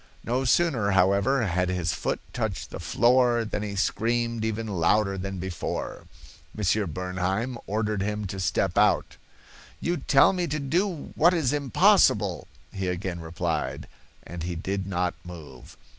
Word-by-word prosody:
No 125 +3 -1
sooner, 130 -7 +2
however, 100 +8 +3
had 90 -1 0
his 90 -2 -1
foot - - -2
touched - - -3
the - - -6
floor 120 +6 +3
than 105 - -3
he 105 -1 -4
screamed 115 +3 0
even 110 0 -2
louder 100 +1 +1
than 95 0 -5
before. 85 -1 -5 0.5
Monsieur 105 0 +1
Bernheim 95 - -2
ordered 105 0 -1
him 105 +1 -2
to 95 0 -5
step 95 - 0
out. - - +2 0.6
'You 175 +1 -1
tell 135 +3 +4
me 180 -2 -1
to 150 - -2
do 165 +4 -1
what 175 +3 +4
is 145 -5 +1
impossible,' 140 -5 +3 0.3
he 95 -1 -3
again 90 -1 -3
replied, 80 0 -3 0.4
and 85 -1 -8
he 85 +1 -3
did 95 +3 -3
not 90 -2 -1
move. 80 -8 -11
100 Hz, 145 wpm, -26 LUFS, 90-120 Hz, 0.6 s, tell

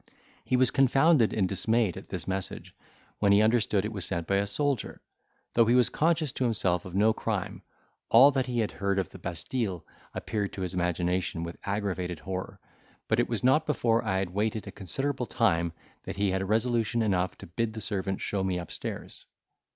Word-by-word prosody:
He 130 - +1
was 130 0 +3
confounded 135 -1 +4
and 100 -4 +1
dismayed 110 0 +1
at - - -10
this - - -5
message, 95 0 -4 0.5
when 100 -1 +3
he 100 +1 +6
understood 110 -3 +2
it 110 - -4
was 100 -3 -4
sent 85 -2 -3
by 100 - +1
a 100 +1 0
soldier; 140 +5 -1 0.5
though 115 - +5
he 120 - +4
was 125 -1 +4
conscious 160 -2 +1
to - - -2
himself 100 -6 +1
of 90 -1 -8
no 110 +3 +4
crime, - - -3 0.5
all 140 +2 +8
that 135 -2 0
he 120 -2 0
had 110 - -1
heard 100 -1 -1
of 95 -3 -1
the - - -11
Bastille 90 0 -3 0.3
appeared 105 -2 -3
to 95 - -6
his 90 0 -3
imagination 90 -1 -1
with 85 0 -6
aggravated 95 -4 -2
horror, 95 +3 -6 0.5
but - - +2
it - - +1
was - - -2
not 150 +5 +4
before 115 -5 +2
I 95 - 0
had 95 -2 -2
waited 110 +3 -1
a - - -7
considerable 125 - -3
time 85 -8 +1 0.3
that - - -6
he 100 -1 +1
had 95 +1 -2
resolution 115 +1 +1
enough 95 -4 0
to - - -10
bid 110 +6 -2
the 110 - -6
servant 95 -2 -2
show 100 -2 -1
me 95 -1 0
up 85 - -6
stairs. - - -7
105 Hz, 195 wpm, -28 LUFS, 95-120 Hz, 0.5 s, all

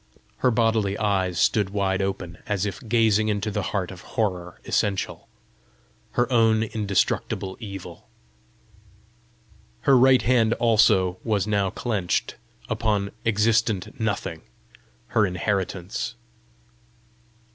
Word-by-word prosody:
Her 125 - +2
bodily 110 -4 +1
eyes 95 -4 0
stood 105 +1 +2
wide 100 -1 0
open, 95 -3 -4
as 105 -2 0
if 105 +6 -4
gazing 110 -2 +3
into 105 0 -1
the - - -1
heart 95 -4 -2
of 90 -2 -10
horror 90 -5 -3
essential 100 -2 -1 0.8
her 120 0 +2
own 110 -1 +4
indestructible 100 -3 -1
evil. 100 -5 -9 1.7
Her 135 - +4
right 130 +1 +5
hand 115 -2 +3
also 105 -6 +3
was 105 -4 0
now 100 -2 +1
clenched 110 +1 -1 0.3
upon 105 -3 0 0.2
existent 110 +1 +1
Nothing 100 -7 -2 0.7
her 110 - +3
inheritance! 95 +3 -2
105 Hz, 105 wpm, -24 LUFS, 95-115 Hz, 1.7 s, right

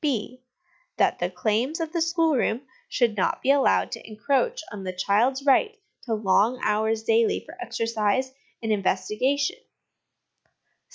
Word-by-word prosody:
() 345 +8 -41
That - - +2
the - - 0
claims 235 +9 -1
of 325 0 -4
the 340 - 0
schoolroom 320 -7 +1 0.3
should 235 -4 +1
not 190 - 0
be 270 - +4
allowed 280 -1 +3
to - - -7
encroach 280 - 0
on 205 -3 -7
the 185 - -3
child's 230 +9 +1
right 425 - +3 0.3
to 230 -3 -1
long 215 +4 +2
hours 220 +1 +1
daily 225 0 +2
for 315 - -12
exercise 230 - -1 0.3
and 225 - -1
investigation. 215 - 0
240 Hz, 135 wpm, -25 LUFS, 215-285 Hz, 0.3 s, be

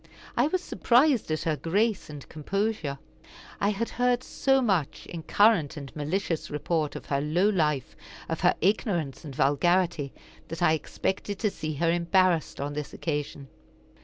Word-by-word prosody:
I 245 +4 +3
was 365 +3 -1
surprised 250 - +3
at 155 0 -1
her 160 -2 +1
grace 200 +4 0
and 145 -2 -9
composure. 170 -2 -2 0.6
I 200 - +2
had 210 +3 -1
heard 245 0 +1
so 270 +1 +2
much, 190 - 0
in 170 - -7
current 180 -3 +3
and 140 -2 -8
malicious 160 +2 -2
report, 150 0 -1
of - - -7
her 140 -1 0
low 170 +7 +2
life, 150 - 0 0.3
of - - -3
her - - +4
ignorance 180 - 0
and 145 -4 -8
vulgarity, 155 +1 +2 0.4
that 165 +2 -4
I 155 - +5
expected 190 +5 -2
to 210 0 0
see 155 -4 -4
her 165 +3 +2
embarrassed 175 0 +2
on 145 +1 -3
this 150 0 -5
occasion. 145 -3 -3
170 Hz, 160 wpm, -27 LUFS, 150-205 Hz, 0.6 s, I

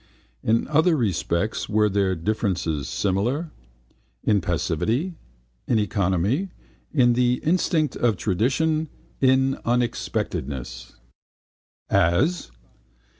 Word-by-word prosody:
In 115 +1 +1
other 160 +3 +3
respects 100 - -1
were 105 0 +3
their 100 -2 +1
differences 85 - -1
similar? 120 - -1 0.7
In 105 -2 +2
passivity, 95 - -1 0.5
in 120 - +2
economy, 105 - 0 0.4
in 125 -5 +4
the 125 0 +2
instinct 160 -3 +1
of 115 -5 +1
tradition, 155 - 0 0.3
in 135 0 +3
unexpectedness. 70 - -2 1.0
As? 125 - +2
110 Hz, 85 wpm, -24 LUFS, 95-135 Hz, 1.0 s, in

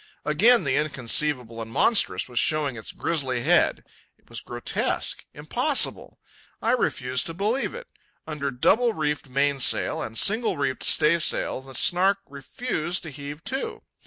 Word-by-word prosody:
Again 225 +12 +4
the 140 -1 +1
inconceivable 130 -4 0
and 115 - -7
monstrous 115 - +2
was 125 -2 -2
showing 150 -4 +1
its 110 - -8
grizzly 135 -7 -2
head. - - +3 0.3
It - - -28
was - - -6
grotesque, 120 -1 -2
impossible. - - +1 0.4
I - - 0
refused 125 0 0
to 165 - -6
believe 220 - -1
it. - - -8 0.4
Under 150 -3 -3
double 220 - +2
reefed 150 -4 -2
mainsail 140 0 +1
and 115 - -6
single 220 -1 +1
reefed 135 -2 -2
staysail 155 -4 +2
the 135 0 -13
Snark 185 +8 +3
refused 155 - -4
to 165 - -7
heave 145 +2 -8
to. 265 +1 -4
145 Hz, 140 wpm, -25 LUFS, 130-175 Hz, 0.4 s, Again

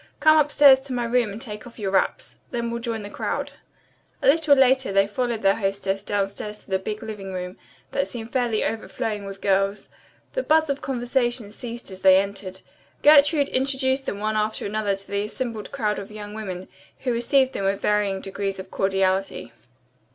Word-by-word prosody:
Come 310 +1 +6
upstairs 285 -2 +6
to 265 -1 -7
my 245 -1 -1
room 235 -2 +1
and 205 - -7
take 220 -2 -7
off 235 - -14
your 200 -4 -2
wraps. 190 - 0
Then 235 -1 -3
we'll 235 0 -3
join 230 -2 -3
the 205 - -7
crowd." - - -3 0.7
A - - +2
little 300 0 +5
later 265 -3 +4
they 195 0 +4
followed 230 +2 -2
their 195 0 +4
hostess 195 -1 -1
downstairs 205 +1 -3
to - - -17
the 190 - +2
big 210 +3 -5
living 205 -3 -6
room, 180 0 -5 0.4
that 275 - 0
seemed 230 -1 -8
fairly 240 -4 +1
overflowing 220 -2 -3
with 195 0 -8
girls. 195 +1 +1 0.4
The - - 0
buzz 315 - +3
of 280 - -4
conversation 245 -3 -1
ceased 235 -1 -7
as 190 0 -9
they 190 0 +7
entered. 195 -1 -5 0.4
Gertrude 290 -1 +6
introduced 265 0 +1
them 200 - -2
one 215 +1 -1
after 215 0 -1
another 205 -1 0
to 195 0 -13
the 200 +1 -1
assembled 225 -1 -5
crowd 210 -1 -1
of 200 - -8
young 210 -1 -8
women, 190 -4 -6 0.3
who 250 -2 0
received 260 +3 +2
them 195 - -3
with 195 +1 +1
varying 205 -2 +1
degrees 195 0 -3
of 190 0 -9
cordiality. 195 -8 0
215 Hz, 190 wpm, -24 LUFS, 195-255 Hz, 0.7 s, they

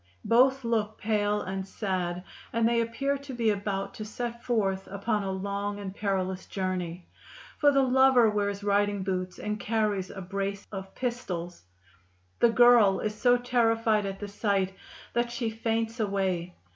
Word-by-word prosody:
Both 260 +3 +4
look 220 -2 -1
pale 210 -1 0
and 190 +1 -4
sad, 180 -3 -2 0.3
and 230 0 +2
they 235 0 +2
appear 275 +5 -1
to 280 -1 -8
be 230 -2 +2
about 195 -1 -3
to 215 - -6
set 235 +2 -5
forth 195 -5 0
upon 210 +2 -1
a 195 - -3
long 200 +1 -3
and 195 -2 -6
perilous 190 -2 -2
journey, 180 -2 -3 0.5
for 290 -1 +6
the 275 -1 +4
lover 260 -2 +5
wears 205 -1 -1
riding 205 -1 +1
boots 185 -1 -3
and 210 0 -3
carries 210 -3 0
a 195 - -8
brace 195 +1 -3
of 190 -1 -7
pistols. 180 - -4 0.7
The 235 - +6
girl 230 -4 +6
is 215 - -2
so 245 +3 +3
terrified 225 -4 +2
at 195 0 -5
the 205 - -5
sight 200 -2 0 0.4
that 240 0 +1
she 235 -2 -2
faints 225 +1 -2
away. 190 -4 -1
205 Hz, 160 wpm, -28 LUFS, 195-230 Hz, 0.7 s, for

